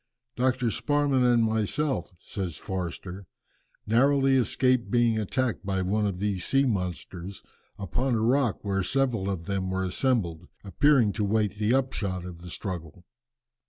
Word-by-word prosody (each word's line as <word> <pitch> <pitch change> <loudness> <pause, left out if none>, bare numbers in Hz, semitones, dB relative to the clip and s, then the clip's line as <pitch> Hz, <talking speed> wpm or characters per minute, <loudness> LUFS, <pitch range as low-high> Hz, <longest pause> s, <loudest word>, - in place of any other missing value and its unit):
"Dr. 125 -1 +1
Sparman 145 -2 +1
and 120 -2 +4
myself," 110 +6 -1
says 90 -5 -5
Forster, 95 0 -5 0.6
"narrowly 135 +4 +3
escaped 130 -1 +2
being 120 -2 +2
attacked 120 +3 -1
by 95 -1 -1
one 105 +3 +1
of 95 -3 -3
these 100 -1 -2
sea 135 0 +2
monsters, 90 -3 -4 0.3
upon 120 +6 -1
a - - +1
rock 120 -1 +1
where 95 -1 0
several 115 -2 0
of 90 -4 -3
them 95 -1 -2
were 95 0 -1
assembled, 90 -5 -1 0.2
appearing 125 +2 +3
to 105 - -2
wait 105 0 0
the 110 +4 +2
upshot 100 -9 -2
of 90 -2 -8
the 90 - -9
struggle. 85 -3 -6
105 Hz, 145 wpm, -27 LUFS, 95-125 Hz, 0.6 s, and